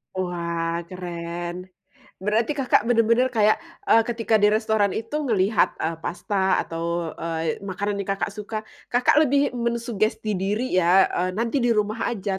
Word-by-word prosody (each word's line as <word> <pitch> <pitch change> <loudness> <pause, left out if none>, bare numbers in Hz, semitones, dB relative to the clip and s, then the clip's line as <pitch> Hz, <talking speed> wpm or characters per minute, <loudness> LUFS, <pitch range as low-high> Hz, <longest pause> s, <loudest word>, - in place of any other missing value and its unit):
Wah 170 -2 -2
keren, 175 0 -6 0.5
berarti 220 +7 +1
Kakak 270 -4 +2
bener-bener 230 +1 +3
kayak, 215 -4 +3 0.3
eee, 225 - +7
ketika 230 -2 +1
di 205 - +4
restoran 220 -3 +1
itu 230 +7 -3
ngelihat, 205 -2 +2
eee, 160 0 -2
pasta 190 +2 0
atau, 170 0 -3
eee, 165 -1 -2
makanan 200 +1 -3
yang 200 - -4
Kakak 195 - -3
suka, 215 +1 -5 0.2
Kakak 250 +4 +3
lebih 285 -1 +3
mensugesti 230 -4 -1
diri 205 +2 0
ya, 185 +2 +5
eee, 180 +1 -1
nanti 230 +5 0
di 240 -2 +2
rumah 215 +1 0
aja 195 -2 -3
205 Hz, 145 wpm, -24 LUFS, 180-230 Hz, 0.5 s, eee